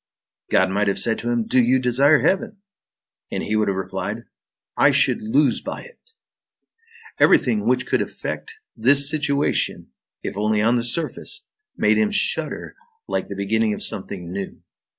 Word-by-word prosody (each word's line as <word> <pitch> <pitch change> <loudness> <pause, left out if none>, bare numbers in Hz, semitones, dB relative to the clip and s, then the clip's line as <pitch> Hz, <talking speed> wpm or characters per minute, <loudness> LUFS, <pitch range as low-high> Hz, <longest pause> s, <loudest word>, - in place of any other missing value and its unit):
God 95 0 +3
might 105 +2 0
have 100 - +1
said 115 -1 +2
to 120 - -3
him: 120 -2 0
"Do 130 +2 +3
you 125 +2 +3
desire 135 +4 +3
heaven?" 210 +2 0 0.7
and - - -3
he 110 - -2
would 110 -1 +1
have 95 -1 -1
replied: 95 -1 -4 0.5
"I - - +5
should - - +3
lose 130 +5 +2
by - - -6
it." 480 -1 -18 1.1
Everything 210 -2 +3
which 125 0 +1
could - - 0
affect - - -5 0.2
this 140 +5 +4
situation, 145 - 0 0.3
if - - -4
only 105 +1 0
on 115 +3 +3
the 120 - 0
surface, 150 +7 -2 0.3
made - - +3
him 215 -1 +2
shudder 210 - -1 0.3
like - - -2
the 100 - -7
beginning 105 +2 0
of - - -5
something 95 -4 -4
new. 100 +1 -6
120 Hz, 160 wpm, -22 LUFS, 105-140 Hz, 1.1 s, I